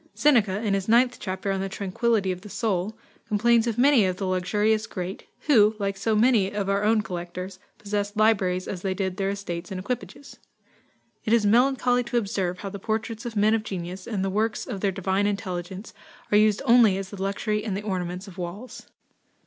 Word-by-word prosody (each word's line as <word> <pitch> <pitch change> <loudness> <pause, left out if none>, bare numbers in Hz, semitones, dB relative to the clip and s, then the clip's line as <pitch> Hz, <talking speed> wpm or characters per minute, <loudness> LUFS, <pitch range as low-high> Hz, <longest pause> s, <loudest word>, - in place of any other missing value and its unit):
Seneca, 220 -8 +3
in 205 -3 +1
his 195 -1 -1
ninth 245 +2 +4
chapter 190 0 -3
on 195 -1 -1
the 195 - -3
Tranquillity 200 +1 0
of 180 0 -5
the 210 - -11
Soul, 210 -1 -2 0.3
complains 230 +2 +3
of 230 -1 -1
many 265 -2 +5
of 185 -1 0
the 195 - -3
luxurious 210 +4 +1
great, 185 0 -6
who, 220 -7 +4
like 200 -1 -2
so 215 +3 0
many 215 -3 +4
of 205 -1 -3
our 200 +1 +1
own 215 0 +3
collectors, 180 +1 -6 0.2
possessed 205 0 -3
libraries 190 -4 +2
as 185 - -5
they 190 -1 -1
did 190 -1 -2
their 195 -1 0
estates 185 -4 -5
and 190 - -4
equipages. 250 +6 -6 0.9
"It 220 - +1
is 230 -3 +4
melancholy 245 +2 +3
to 240 0 -1
observe 195 -5 -1
how 200 - -4
the 200 0 -7
portraits 220 +2 -3
of 230 - -7
men 210 +1 +3
of 225 - +2
genius, 185 -2 -6
and 200 -4 -1
the 195 - -1
works 215 +2 -1
of 205 -7 -5
their 200 - +1
divine 190 +2 0
intelligence, 190 -1 -4 0.4
are 205 - +5
used 215 +1 +3
only 235 -6 +6
as 195 -1 -6
the 200 -2 -7
luxury 210 +2 -1
and 200 -4 -2
the 205 - -5
ornaments 185 -1 -3
of 185 -1 -11
walls." 185 +8 -7
205 Hz, 200 wpm, -25 LUFS, 190-220 Hz, 0.9 s, only